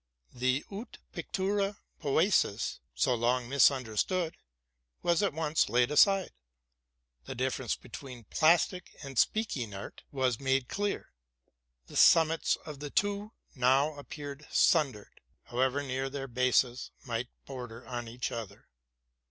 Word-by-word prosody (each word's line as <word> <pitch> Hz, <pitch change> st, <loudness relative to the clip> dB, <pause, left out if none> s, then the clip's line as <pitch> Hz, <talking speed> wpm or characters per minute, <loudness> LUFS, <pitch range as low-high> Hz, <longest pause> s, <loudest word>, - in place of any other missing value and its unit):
The 130 Hz, +3 st, 0 dB
wtf 210 Hz, +5 st, -7 dB, 0.2 s
pictura 200 Hz, +1 st, -1 dB, 0.2 s
poesis, 150 Hz, -, +2 dB, 0.2 s
so 125 Hz, -, +2 dB
long 120 Hz, +1 st, +1 dB
misunderstood, 140 Hz, -, +2 dB, 0.7 s
was 170 Hz, +1 st, +3 dB
at 200 Hz, -, +2 dB
once 160 Hz, -3 st, +1 dB
laid 120 Hz, +4 st, +3 dB
aside: 195 Hz, +5 st, +5 dB, 0.9 s
the -, -, -6 dB
difference 130 Hz, -1 st, -1 dB
between 130 Hz, -4 st, -10 dB
plastic 175 Hz, -, +2 dB
and 135 Hz, -4 st, -3 dB
speaking 135 Hz, -, 0 dB
art' 100 Hz, -, -8 dB
was 130 Hz, -4 st, 0 dB
made 135 Hz, -1 st, +1 dB
clear; 205 Hz, 0 st, -2 dB, 0.7 s
the -, -, -13 dB
summits 165 Hz, 0 st, +5 dB
of 150 Hz, -3 st, -8 dB
the 145 Hz, 0 st, -5 dB
two 205 Hz, +5 st, -1 dB, 0.2 s
now 135 Hz, +4 st, +3 dB
appeared 145 Hz, 0 st, -8 dB
sun 155 Hz, -5 st, +4 dB
dered, 105 Hz, -3 st, -15 dB, 0.2 s
however 130 Hz, +3 st, 0 dB
near 135 Hz, 0 st, -2 dB
their 135 Hz, 0 st, -5 dB
bases 125 Hz, 0 st, +1 dB, 0.2 s
might 120 Hz, 0 st, -3 dB, 0.2 s
border 125 Hz, -3 st, -8 dB
on 120 Hz, -2 st, -4 dB
each 120 Hz, +2 st, -4 dB
other. 115 Hz, -4 st, -7 dB
135 Hz, 125 wpm, -30 LUFS, 125-160 Hz, 0.9 s, aside